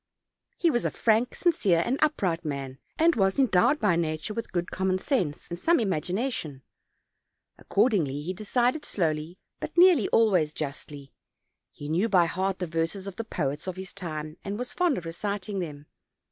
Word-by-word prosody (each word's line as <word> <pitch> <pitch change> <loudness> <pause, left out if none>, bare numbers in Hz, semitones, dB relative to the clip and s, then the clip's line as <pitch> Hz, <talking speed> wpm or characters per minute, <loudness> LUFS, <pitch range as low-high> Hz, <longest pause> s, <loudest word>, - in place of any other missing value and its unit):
He 335 - +3
was 240 -3 +1
a - - +1
frank, 225 +2 +1
sincere, 200 - +2
and 260 +4 -1
up 305 -7 +1
right 170 -2 0
man, 140 -3 -5 0.2
and 330 +1 +4
was 195 -2 +2
endowed 265 +2 +3
by 200 -6 +3
nature 160 +4 -2
with 230 +1 -5
good 175 -1 -2
com 190 0 -1
mon 185 0 +2
sense 185 - -1
and 170 0 -6
some 340 - +3
imagination: 185 - -2 1.0
accordingly 180 - +1
he 180 +4 -3
decided 245 - 0
slowly, 160 - -2 0.2
but 310 - -6
nearly 350 - +6
always 185 -9 +3
justly; 140 -1 -6 0.6
he 145 - -9
knew 175 +9 +1
by 180 -4 +5
heart 190 +2 -1
the 180 - -2
verses 165 +4 -2
of 195 0 -7
the 230 - -2
poets 150 -7 -3
of 185 - -3
his 190 -1 -8
time, 155 -4 -6
and 200 +1 -4
was 245 +1 -5
fond 355 -5 +2
of 170 - -6
reciting 200 +3 -3
them. 150 -4 -6
185 Hz, 175 wpm, -27 LUFS, 160-230 Hz, 1.0 s, nearly